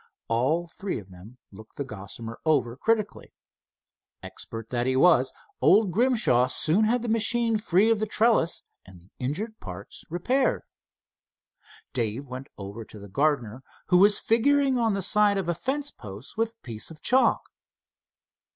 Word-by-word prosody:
All 135 +10 +1
three 195 +3 -5
of 100 -4 -11
them 95 +8 -14
looked 110 +2 -14
the 140 - -3
Gossamer 115 0 -8
over 130 -7 +1
critically. 215 - -2 0.9
Expert 115 0 -7
that 120 0 -1
he 130 - +1
was, 135 -3 +4 0.3
old 205 -2 +5
Grimshaw 215 - +3
soon 160 +10 +2
had 240 +2 +1
the - - -3
machine 230 0 +2
free 210 +1 +3
of 225 - +2
the 215 - -1
trellis 215 -5 +2 0.2
and 95 -2 -15
the 90 +3 -24
injured 200 - -3
parts - - -9
repaired. 250 +11 0 1.3
Dave 120 +2 -2
went 130 0 -8
over 100 +3 -7
to 110 - -14
the 100 -1 -11
gardener, 135 -2 0 0.3
who 180 - +5
was 205 +2 +5
figuring 275 +4 +2
on 225 -4 +1
the 195 - -2
side 205 +1 +4
of 190 -3 -2
a 175 - +1
fence 275 - -3
post 105 +3 -10
with 225 +1 -1
a 230 - -57
piece 110 -3 -6
of 160 -2 -14
chalk. 260 +1 +3
165 Hz, 160 wpm, -26 LUFS, -, 1.3 s, old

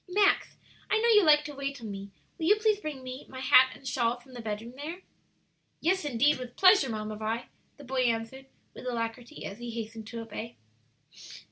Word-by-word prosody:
"Max, 400 +2 +2 0.3
I - - +3
know 470 +1 +3
you 420 -3 +7
like 300 -2 +6
to 295 - -6
wait 275 0 -4
on 220 -3 -6
me; 200 0 -7 0.3
will 320 - 0
you 415 - +7
please 430 -1 +2
bring 300 -8 -6 0.3
my 260 - -8
hat 260 0 +7
and 270 - -11
shawl 245 -2 0
from 255 +1 -18
the 245 - -7
bedroom 220 +2 -5
there?" 325 +7 -7 0.8
"Yes, 375 +2 +1
indeed, 285 +2 +3
with 245 -1 -8
pleasure, 370 - +6
Mamma 215 -1 -4
Vi," 225 +2 -2 0.3
the 290 - -12
boy 260 0 -1
answered, 235 +3 -2 0.3
with - - -9
alacrity, 235 +3 -4
as 200 - -7
he 240 0 -6
hastened 225 -1 -6
to 230 0 -6
obey. 225 +1 -7
255 Hz, 195 wpm, -29 LUFS, 230-300 Hz, 0.8 s, you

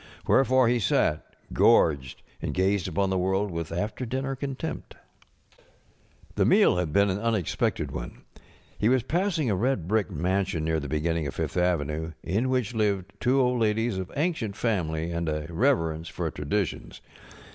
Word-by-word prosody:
Wherefore 130 -2 +4
he 120 +1 +2
sat, 75 -6 0 0.2
gorged, 70 -5 +3 0.2
and - - -3
gazed 95 0 +1
upon 95 +2 0
the 95 - +1
world 95 +2 0
with 85 -1 -4
after 105 +9 -3
dinner 135 +3 -2
contempt. 140 +3 -5 1.4
The - - +1
meal - - +5
had 90 -4 -1
been 100 +4 +3
an 95 - -2
unexpected 110 -6 -1
one. - - -7 0.6
He 105 - +3
was 130 -2 +3
passing 170 - 0
a - - +1
red 105 -4 0
brick 105 -2 +1
mansion 90 +1 -1
near 80 0 +1
the 70 -2 -6
beginning 80 +1 -1
of 70 - -6
Fifth - - -3
avenue, 80 -3 0
in 110 +9 0
which 125 -3 0
lived 100 -3 0
two 130 +3 +2
old 125 -1 +2
ladies 110 -1 +1
of 95 - -6
ancient 145 - -1
family 85 -8 -1
and 85 -1 -2
a 75 0 -2
reverence 80 - +1
for - - -3
traditions. 80 +6 -3
95 Hz, 160 wpm, -26 LUFS, 80-120 Hz, 1.4 s, meal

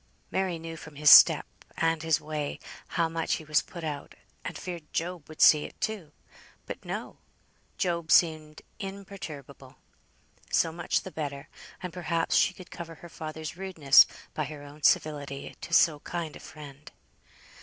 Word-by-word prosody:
Mary 190 -3 0
knew 165 0 -7
from 155 -2 -11
his 150 0 +6
step, - - +9 0.3
and 165 -1 +1
his 160 -1 +2
way, 150 -1 -4 0.4
how 165 - +3
much 165 0 -2
he - - -7
was 150 -1 +3
put 170 -2 -10
out, 150 -3 -5 0.3
and - - -5
feared 170 -4 -7
Job 170 -2 -3
would 155 - -12
see 150 -1 +7
it, - - -10
too. 200 -9 -3 0.5
But - - -7
no! - - -6 0.6
Job 170 -3 -1
seemed 155 -2 +3 0.2
imperturbable. 195 - -8 0.8
So 165 - +3
much 170 +2 -1
the 190 - -9
better, 140 -4 -5 0.3
and 180 -2 -5
perhaps 170 -1 -1
she 185 - +3
could 185 -3 -13
cover 165 -1 -8
her 170 +2 -13
father's 155 -1 -7
rudeness 175 -7 +5 0.3
by 155 - -2
her 145 0 -8
own 145 +1 -13
civility 145 -2 0
to - - -8
so 160 -3 +5
kind 165 -1 -5
a - - -10
friend. 145 -1 -12
160 Hz, 160 wpm, -28 LUFS, 150-170 Hz, 0.8 s, step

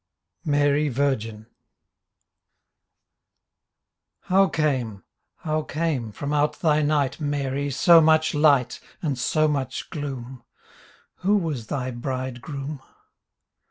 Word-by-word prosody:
MARY 145 0 +2
VIRGIN 115 -5 -1 2.8
How 195 +1 +3
came, 130 - -1 0.3
how 155 0 -2
came 150 -7 -2
from 145 +7 -4
out 150 0 +1
thy 155 -2 +2
night 145 -2 0
Mary, 145 -1 -2
so 165 +5 +6
much 160 0 +3
light 145 -4 +3 0.2
And 145 -4 0
so 155 +5 +1
much 135 -3 -3
gloom: 130 -4 -6 0.7
Who 205 +3 +2
was 150 - -3
thy 130 -1 -3
bridegroom? 130 +3 -5
145 Hz, 95 wpm, -24 LUFS, 130-155 Hz, 2.8 s, so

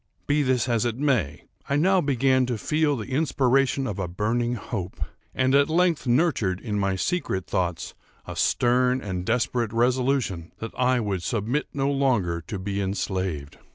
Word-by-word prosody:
Be 145 +1 +2
this 130 -3 +1
as 115 -3 +1
it 120 -1 -1
may, 125 - 0 0.3
I 140 - +2
now 185 +5 +3
began 130 -2 +2
to 120 -2 -1
feel 150 +4 +1
the 115 +3 -6
inspiration 135 -1 +2
of 105 -6 -4
a 95 - -1
burning 115 +7 -1
hope, 100 -6 -5 0.4
and 130 0 +2
at 140 +1 +4
length 170 -3 +2
nurtured 120 - +2
in 105 -2 -3
my 100 -1 +1
secret 95 - -1
thoughts 90 -2 -2 0.3
a - - -7
stern 125 +1 +2
and 95 -6 -4
desperate 120 -1 0
resolution 125 -7 0
that 115 - -6
I 125 0 +2
would 100 -5 -2
submit 115 +8 -1
no 140 0 0
longer 115 -12 +1
to 105 - -4
be 100 +1 -3
enslaved. 95 -6 -3
120 Hz, 165 wpm, -25 LUFS, 100-135 Hz, 0.4 s, at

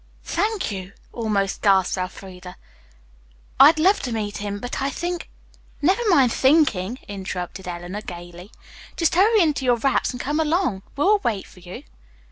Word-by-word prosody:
"Thank 410 - -1
you," 190 -1 -7 0.2
almost 210 -4 -1
gasped 195 -3 +3
Elfreda. 185 0 -7 1.0
"I'd 300 +4 +8
love 375 +6 +4
to 250 - -4
meet 210 -2 -3
him, 205 0 -4
but 245 +5 -5
I 275 - 0
think 350 +4 -4 0.3
" - - -32 0.2
"Never 375 +9 +3
mind 270 -10 +4
thinking," 260 - +2
interrupted 190 -2 -6
Eleanor, 175 +3 -6
gayly. 175 +1 -10 0.5
"Just 335 - +2
hurry 415 +4 +4
into 300 -4 0
your 245 -2 +3
wraps 270 +3 +1
and 250 - -5
come 295 +5 -1
along. 315 - 0
We'll 400 +9 +3
wait 215 - -2
for - - -17
you." 180 0 -10
230 Hz, 155 wpm, -22 LUFS, 190-310 Hz, 1.0 s, I'd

